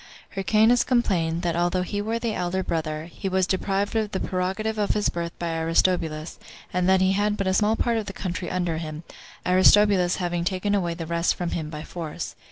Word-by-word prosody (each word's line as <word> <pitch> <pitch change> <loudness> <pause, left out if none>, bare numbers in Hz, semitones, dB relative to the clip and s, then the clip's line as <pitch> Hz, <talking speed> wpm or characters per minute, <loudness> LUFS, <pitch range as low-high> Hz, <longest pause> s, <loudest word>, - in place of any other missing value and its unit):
Hyrcanus 215 +5 +3
complained, 175 -9 +1
that 170 -1 0
although 175 +1 +1
he 205 +3 -3
were 225 +2 -1
the 230 -1 -2
elder 185 0 -1
brother, 155 -2 -2
he 175 +3 -5
was 190 0 +2
deprived 195 +3 -1
of 220 -2 +1
the 190 - -3
prerogative 190 +4 -2
of 205 - +1
his 210 - +2
birth 170 -1 -3
by 170 -1 -2
Aristobulus, 165 -1 0 0.3
and 180 +1 +1
that 190 0 +4
he 190 0 +4
had 205 +2 +1
but 195 - -1
a 190 - +1
small 210 +3 +3
part 235 0 +1
of 215 -2 -3
the - - -3
country 180 -2 -4
under 175 -3 -1
him, 155 0 -6 0.4
Aristobulus 185 0 +5
having 175 -1 -2
taken 185 +3 -1
away 175 -4 0
the 165 -1 -5
rest 170 +1 +1
from 175 -1 -3
him 155 -2 -3
by 150 -1 -6
force. 165 -2 -6
185 Hz, 205 wpm, -25 LUFS, 170-205 Hz, 0.4 s, Aristobulus